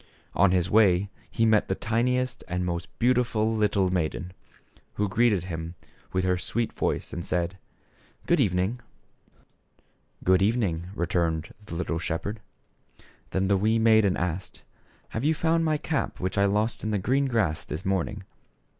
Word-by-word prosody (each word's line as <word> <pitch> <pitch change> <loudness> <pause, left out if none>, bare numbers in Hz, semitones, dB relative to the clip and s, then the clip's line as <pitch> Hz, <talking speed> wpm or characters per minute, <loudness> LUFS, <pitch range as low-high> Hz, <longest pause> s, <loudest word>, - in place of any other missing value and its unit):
On 100 +1 +4
his 90 -1 +2
way 100 -2 +4 0.2
he 115 - +1
met 110 -1 +3
the 95 - 0
tiniest 125 +3 0
and 90 0 -2
most 85 0 -3
beautiful 115 -3 +2
little 100 -3 +2
maiden, 90 +1 -2 0.6
who 105 - 0
greeted 105 -2 +2
him 85 -1 -5 0.4
with 95 0 0
her 90 -1 +1
sweet 115 +5 -2
voice - - -2
and 85 - -4
said, 90 +2 -2 0.3
" - - -32
Good - - +3
evening! 95 +6 +1 0.5
" - - -36
" - - -26
Good 95 +1 +4
evening," 100 -6 +1
returned 85 -2 -1
the 85 - -6
little 85 -1 -2
shepherd. 95 +7 -3 0.9
Then 95 0 0
the 100 0 +3
wee 110 +4 +2
maiden 110 -4 +4
asked, 90 +1 -4 0.2
" - - -33
Have 110 - -4
you 155 +2 +3
found 165 +1 +1
my 155 -1 +2
cap 150 -1 -2
which 95 +1 -2
I 100 - +3
lost 105 +3 0
in 110 - -1
the 105 - +1
green 130 +8 +1
grass 105 -11 0
this 75 - -6
morning 95 +1 -1
100 Hz, 165 wpm, -26 LUFS, 90-115 Hz, 0.9 s, On